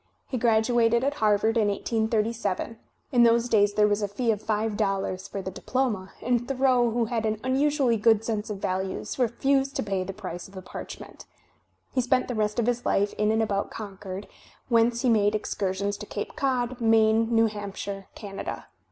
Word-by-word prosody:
He 255 - -3
gradu 230 +1 +3
ated 235 +2 +3
at 280 +1 +1
Harvard 215 +2 +3
in 215 -2 +3
1837; 220 0 -1 0.3
in 245 -3 +4
those 235 0 +4
days 205 -3 +3
there 210 0 +5
was 205 0 +1
a 205 - 0
fee 225 +4 0
of 210 -1 -2
five 215 0 -1
dollars 195 -2 -1
for 195 - -5
the 190 - -4
diploma, 215 -3 -2
and 240 0 +1
Thoreau, 255 -3 +3
who 230 0 0
had 225 -1 -2
an 215 -1 -1
unusually 265 -2 +2
good 220 0 +4
sense 220 -2 -2
of 210 - -3
values, 190 +5 -3
refused 270 +3 +1
to - - -1
pay 195 -3 -1
the 190 - -5
price 185 -3 -7
of 195 - -17
the 185 - -7
parchment. - - -9 0.7
He 255 - +2
spent 255 +1 +1
the 250 - -3
rest 215 -1 -1
of 235 - +2
his 245 0 0
life 200 +1 +1
in 210 0 +3
and 220 0 +2
about 200 -2 -1
Con 205 -3 -8
cord, 195 0 -6 0.4
whence 235 0 +3
he - - +2
made 210 -2 +3
excursions 200 -1 -2
to 210 - -8
Cape 205 - -5
Cod, 255 -4 -1
Maine, 225 0 +4
New 225 -1 +4
Hampshire, 200 -2 -5
Canada. 200 -2 -6
220 Hz, 195 wpm, -26 LUFS, 205-240 Hz, 0.7 s, there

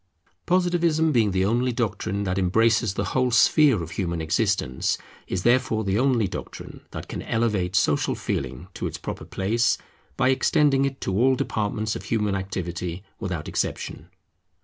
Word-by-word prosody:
Positivism 175 -3 +2
being 115 -6 +3
the 95 0 +1
only 120 +4 +1
doctrine 100 -4 -2
that 95 -1 -1
embraces 110 +2 +2
the 100 - -1
whole 130 -1 +2
sphere 125 - +4
of 80 - -8
human 85 -4 -2
existence, 80 - 0 0.3
is 95 -1 -2
therefore 120 -2 +2
the 100 +1 0
only 125 -5 +2
doctrine 95 - -8
that - - -7
can - - -5
elevate 105 -6 0
Social 75 -5 +2
Feeling 65 +5 -4
to - - -3
its - - -5
proper - - -6
place, 110 +5 +1 0.4
by 125 - +3
extending 135 +1 +3
it 135 0 -4
to 95 - -2
all 130 +5 +4
departments 110 -4 -2
of - - -7
human 105 -3 0
activity 90 -2 -4 0.2
without 90 -7 -4
exception. - - -3
105 Hz, 155 wpm, -24 LUFS, 95-125 Hz, 0.4 s, sphere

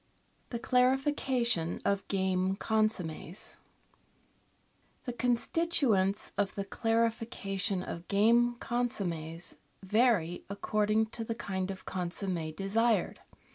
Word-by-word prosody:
The 240 - -3
Clarification 250 - +2
of 200 -1 +1
Game 190 -1 +1
Consommes 200 -5 -1 1.5
The 245 - -4
constituents 240 - +1
of 200 -2 0
the 200 - -3
clarification 225 -4 0
of 170 0 -7
game 235 +4 +4
consommes 175 -10 -2 0.3
vary 205 -4 +2
according 215 +2 +1
to 230 - -4
the 225 0 -3
kind 190 -4 -3
of 190 -1 -6
consomm^ 175 -3 -3
desired. 210 +1 +1
205 Hz, 95 wpm, -31 LUFS, 185-235 Hz, 1.5 s, game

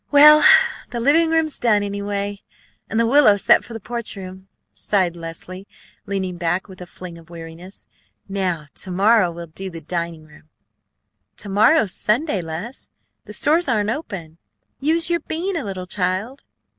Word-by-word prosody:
"Well, 300 +1 +8 0.5
the 240 - -4
living 310 +7 +3
room's 320 -2 0
done, 210 -4 +2
anyway, 200 0 -4 0.5
and 220 - -1
the 230 - +3
willow 235 -4 +5
set - - +4
for 235 - -11
the 225 - -6
porch 235 +2 -6
room!" 190 0 -10 0.3
sighed 185 -4 0
Leslie, 175 +3 -9 0.4
leaning 190 -3 -3
back 175 +2 -1
with 185 -2 -13
a 180 - -8
fling 175 -1 -10
of 165 0 -18
weariness. 170 +3 -11 0.4
"Now 185 -5 -2
to - - -5
morrow 200 +1 +3
we'll 170 0 -8
do 190 +4 -7
the 165 -2 -8
dining 170 0 -5
room." 155 0 -19 0.9
"To 205 - -6
morrow's 215 - +4
Sunday, 220 - 0
Les; 170 +10 -7 0.4
the - - -9
stores 320 +3 +2
aren't 215 -3 +1
open. 175 - -7 0.4
Use 325 +4 +1
your 340 - +2
bean 350 +5 -3
a 330 - -2
little, 190 -3 -5
child." 190 +8 -3
200 Hz, 160 wpm, -21 LUFS, 175-235 Hz, 0.9 s, Well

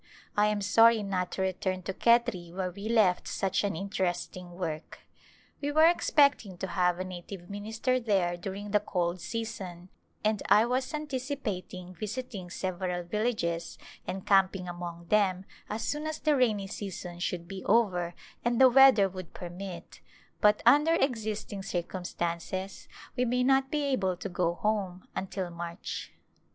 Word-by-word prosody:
I 210 0 +4
am 210 -1 0
sorry 225 +2 +5
not 185 -2 -2
to 190 - -1
return 185 0 -2
to 190 - -3
Khetri 235 -7 +2
where 185 0 -3
we 200 +4 -6
left 210 -6 +3
such 195 +1 0
an 200 -3 -1
interesting 185 -1 -3
work. 165 -3 -5 0.6
We 290 0 -1
were 310 +2 +6
expect 295 -5 +4
ing 190 -4 -10
to 190 - -4
have 180 -2 +2
a 185 - -2
native 185 +1 -8
minister 220 +5 -1
there 195 -7 +1
during 200 +3 -6
the 210 - +4
cold 180 -3 -2
season, 185 -3 -5 0.3
and 215 -1 +1
I 215 +2 +7
was 255 +3 -1
anticipating 255 -11 -4
visiting 215 -2 -5
several 180 -1 -3
villages 175 -4 -2 0.3
and 190 0 -4
camping 195 -2 +3
among 175 -1 -6
them 190 -3 +2 0.2
as 220 +1 -3
soon 300 +5 -2
as 310 0 -3
the 305 -2 +2
rainy 220 -7 +2
season 185 -3 -6
should 175 -1 -3
be 190 0 -7
over 180 -6 +2 0.3
and 240 -1 +1
the 260 -1 +9
weather 265 -6 +7
would 185 -2 -9
permit, 180 0 -8 0.4
but 210 -1 +4
under 300 +3 +6
existing 220 -8 -1
circumstances 180 +1 -4 0.3
we 250 - +1
may 250 +1 +1
not 270 +1 +3
be 295 0 0
able 195 -10 0
to 195 - -5
go 175 -1 0
home 195 -3 -2
until 190 -2 -3
March. 170 +2 -6
195 Hz, 155 wpm, -29 LUFS, 180-230 Hz, 0.6 s, the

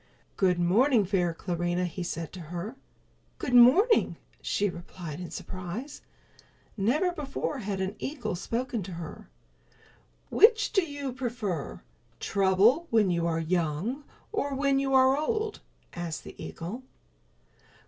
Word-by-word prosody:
"Good 185 -2 +3
morning, 210 +6 +4
fair 180 -2 +1
Clarinha," 175 +1 -1
he 175 +1 -5
said 165 -2 -4
to 185 - -8
her. 175 +8 -5 0.6
"Good 250 - -3
morning," 285 - +6 0.2
she 205 - +1
replied 170 -3 -7
in 180 - -6
surprise. 185 +10 -6 0.7
Never 265 - +2
before 295 -2 -3
had 200 -3 -3
an 190 +2 -2
eagle 250 - -3
spoken 235 +5 -2
to 185 0 -7
her. 165 -2 -8 1.0
"Which 440 -1 +5
do 390 -3 +4
you 285 -4 -5
prefer, 235 - -3 0.4
trouble 200 - +3
when 215 -5 +3
you 170 -1 +1
are 165 -1 0
young 175 - -1 0.3
or 285 -10 -1
when 275 0 +2
you 270 -1 +1
are 260 0 +6
old?" 430 +8 -1 0.3
asked 170 -2 -4
the - - -10
eagle. 185 +10 -6
210 Hz, 130 wpm, -28 LUFS, 175-275 Hz, 1.0 s, morning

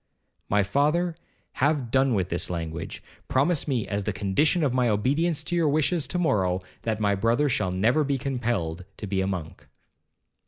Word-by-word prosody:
'My 105 0 +3
father, 150 - +1 0.5
have 140 -4 +1
done 130 -2 +3
with 95 -2 0
this 85 +2 -1
language. 80 -2 -5 0.2
Promise 145 +4 +2
me, 125 -7 -1
as 100 0 -2
the 105 - -1
condition 100 - +1
of 135 -4 +1
my 125 -2 +2
obedience 145 +10 +1
to 175 - -3
your 165 -3 +3
wishes 155 +2 +1
to 180 - -2
morrow, 95 - +1 0.2
that 110 -1 -2
my 100 -2 +2
brother 115 +8 +2
shall 105 -8 0
never 115 +12 +2
be 140 -1 0
compelled 120 - -2
to - - -6
be 95 -1 -1
a 95 - 0
monk.' 90 -5 -5
120 Hz, 180 wpm, -26 LUFS, 95-145 Hz, 0.5 s, My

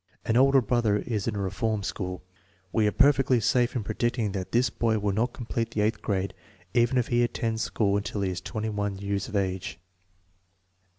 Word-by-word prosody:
An 115 - +1
older 135 +2 +6
brother 110 -2 +2
is 105 -2 -3
in 110 - -1
a - - -2
reform 100 +2 -1
school. 90 -2 -4 0.5
We 110 -2 +2
are - - +2
perfectly 135 0 +4
safe 120 +3 +2
in 120 - -1
predicting 110 0 -1
that 95 -2 -4
this 120 0 +2
boy 110 -1 +1
will 105 -1 0
not 115 +5 +1
complete 115 -1 -3
the 105 - -1
eighth 110 +2 0
grade 95 -2 -1 0.4
even 120 +1 +3
if 125 - +1
he 120 0 +3
attends 115 -1 -1
school 100 -3 +1
till 100 0 -4
he 95 -1 0
is 90 0 -4
21 105 -1 -3
years 100 0 -2
of - - -7
age. 95 -2 -2
110 Hz, 190 wpm, -27 LUFS, 100-120 Hz, 0.5 s, older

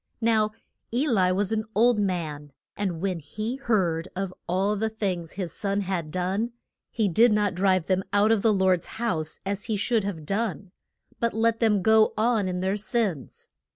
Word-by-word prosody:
Now 220 -2 +3 0.4
E 255 +6 +1
li 190 -8 +3
was 195 +2 0
an 220 -1 0
old 235 +1 +4
man, 155 -7 -3 0.2
and 185 -5 -3
when 185 -3 -1
he 215 - -5
heard 185 -10 0
of 190 0 -3
all 195 +4 +1
the 220 +2 -1
things 185 -6 -3
his 180 -4 -4
sons 200 -1 -1
had 180 -5 -3
done, 190 +8 -2 0.4
he 220 -3 0
did 225 +6 +4
not 210 -2 +2
drive 185 -1 +2
them 190 0 +1
out 205 +2 +3
of 225 -3 +3
the 225 - +4
Lord's 190 -3 +2
house 165 -10 -1
as 200 +1 -2
he 220 - -1
should 220 +1 +1
have 175 -6 -5
done, 200 0 -2 0.5
but 235 -1 0
let 230 0 +2
them 210 -5 +2
go 220 +1 +4
on 220 -2 +2
in 180 0 -2
their 190 +2 0
sins. 210 - -2
200 Hz, 185 wpm, -26 LUFS, 180-220 Hz, 0.5 s, old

